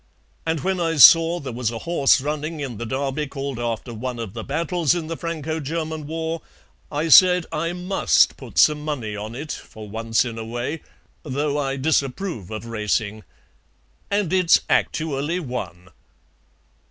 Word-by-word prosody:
And 160 Hz, -2 st, 0 dB
when 190 Hz, 0 st, -1 dB
I 165 Hz, -1 st, 0 dB
saw 165 Hz, +3 st, +8 dB
there 135 Hz, -5 st, -6 dB
was 120 Hz, -1 st, -1 dB
a 115 Hz, -, -5 dB
horse 145 Hz, 0 st, +3 dB
running 150 Hz, +2 st, -3 dB
in 130 Hz, -6 st, -5 dB
the 120 Hz, -, -4 dB
Derby 135 Hz, +3 st, -2 dB
called 135 Hz, -2 st, -5 dB
after 120 Hz, 0 st, -3 dB
one 125 Hz, +2 st, -4 dB
of 115 Hz, -4 st, -6 dB
the 115 Hz, -1 st, -6 dB
battles 165 Hz, +3 st, 0 dB
in 170 Hz, -2 st, -3 dB
the 165 Hz, +1 st, -4 dB
Franco 160 Hz, -2 st, -4 dB
German 155 Hz, 0 st, -4 dB
war, 160 Hz, +1 st, -3 dB, 0.5 s
I 150 Hz, +2 st, -1 dB
said 180 Hz, +3 st, +7 dB
I 165 Hz, +3 st, -2 dB
MUST 180 Hz, +2 st, +2 dB
put -, -, -12 dB
some 150 Hz, -1 st, +5 dB
money 125 Hz, -9 st, -3 dB
on 105 Hz, +3 st, -6 dB
it, 150 Hz, +4 st, -6 dB
for 110 Hz, -1 st, -9 dB
once 115 Hz, +3 st, 0 dB
in 115 Hz, -2 st, -5 dB
a -, -, -4 dB
way, 120 Hz, +7 st, -4 dB, 0.4 s
though 145 Hz, 0 st, -2 dB
I 135 Hz, -1 st, -1 dB
disapprove 140 Hz, -, -1 dB
of 110 Hz, +1 st, -6 dB
racing. 110 Hz, -1 st, -2 dB, 0.9 s
And 200 Hz, -4 st, 0 dB
it's 185 Hz, -3 st, +5 dB
actually 155 Hz, +2 st, 0 dB
won." 120 Hz, -, -6 dB
145 Hz, 165 wpm, -22 LUFS, 120-165 Hz, 0.9 s, saw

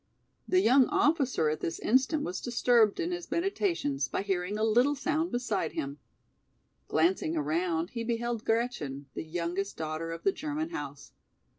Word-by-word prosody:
The 370 Hz, 0 st, +4 dB
young 255 Hz, -1 st, +5 dB
officer 275 Hz, -, +2 dB
at 155 Hz, -, -2 dB
this 165 Hz, -, -3 dB
instant 265 Hz, +6 st, +2 dB
was 180 Hz, -, -4 dB
disturbed 235 Hz, -3 st, +3 dB
in 350 Hz, 0 st, -1 dB
his 350 Hz, 0 st, -5 dB
meditations 340 Hz, -, 0 dB
by 190 Hz, -, -2 dB
hearing 195 Hz, 0 st, -1 dB
a 215 Hz, -, 0 dB
little 245 Hz, +6 st, +4 dB
sound 310 Hz, +4 st, -1 dB
beside 245 Hz, -9 st, -1 dB
him. 140 Hz, +1 st, -4 dB, 0.9 s
Glancing 165 Hz, 0 st, +1 dB
around 165 Hz, +3 st, 0 dB
he 230 Hz, -1 st, -3 dB
beheld 235 Hz, -1 st, -2 dB
Gretchen, 225 Hz, -, -1 dB
the -, -, -4 dB
youngest 175 Hz, +5 st, -3 dB
daughter 160 Hz, +1 st, -3 dB
of 165 Hz, 0 st, -7 dB
the 195 Hz, -, +4 dB
German 310 Hz, -, -4 dB
house. 140 Hz, -1 st, -7 dB
215 Hz, 155 wpm, -30 LUFS, 165-265 Hz, 0.9 s, young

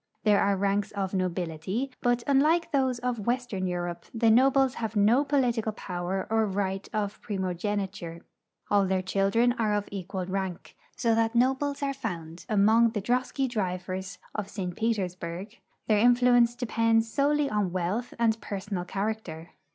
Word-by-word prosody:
There 210 Hz, -2 st, +4 dB
are 200 Hz, 0 st, +2 dB
ranks 200 Hz, +1 st, 0 dB
of 195 Hz, -2 st, -3 dB
nobility, 185 Hz, -, -2 dB
but, 245 Hz, -1 st, +1 dB
unlike 305 Hz, +5 st, +3 dB
those 260 Hz, -3 st, +1 dB
of 245 Hz, -1 st, -2 dB
Avestern 235 Hz, -4 st, -1 dB
Europe, 175 Hz, -1 st, -3 dB
the 225 Hz, -1 st, +4 dB
nobles 265 Hz, +2 st, +4 dB
have 225 Hz, -1 st, -3 dB
no 220 Hz, +7 st, +4 dB
[)olitical 245 Hz, -6 st, +1 dB
poAver 180 Hz, 0 st, -3 dB
or 225 Hz, -1 st, +3 dB
right 195 Hz, 0 st, -2 dB
of 210 Hz, -1 st, -3 dB
primogeniture. 190 Hz, -2 st, -3 dB, 0.5 s
All 200 Hz, -2 st, +4 dB
their 185 Hz, 0 st, 0 dB
children 195 Hz, +6 st, +2 dB
are 215 Hz, -2 st, +2 dB
of 205 Hz, -1 st, -2 dB
equal 190 Hz, -1 st, -4 dB
rank, 190 Hz, -1 st, -4 dB, 0.2 s
so 230 Hz, -2 st, +2 dB
that 225 Hz, +1 st, +1 dB
nobles 270 Hz, +4 st, +1 dB
are 275 Hz, 0 st, 0 dB
found 175 Hz, -10 st, -6 dB
among 220 Hz, +2 st, +4 dB
the 210 Hz, -, -1 dB
drosky 255 Hz, +3 st, 0 dB
drivers 185 Hz, -4 st, -3 dB, 0.2 s
of 205 Hz, -2 st, -4 dB
>St. 180 Hz, -4 st, -4 dB
Petersburg; 190 Hz, -2 st, -3 dB, 0.3 s
their 215 Hz, -2 st, +3 dB
influence 245 Hz, 0 st, +5 dB
de[)ends 230 Hz, -2 st, +2 dB
solely 285 Hz, +4 st, +1 dB
on 210 Hz, -6 st, 0 dB
Avealth 185 Hz, +7 st, -2 dB
and 225 Hz, -2 st, +1 dB
personal 195 Hz, -3 st, -4 dB
character. 195 Hz, -5 st, -4 dB
210 Hz, 150 wpm, -28 LUFS, 190-240 Hz, 0.5 s, influence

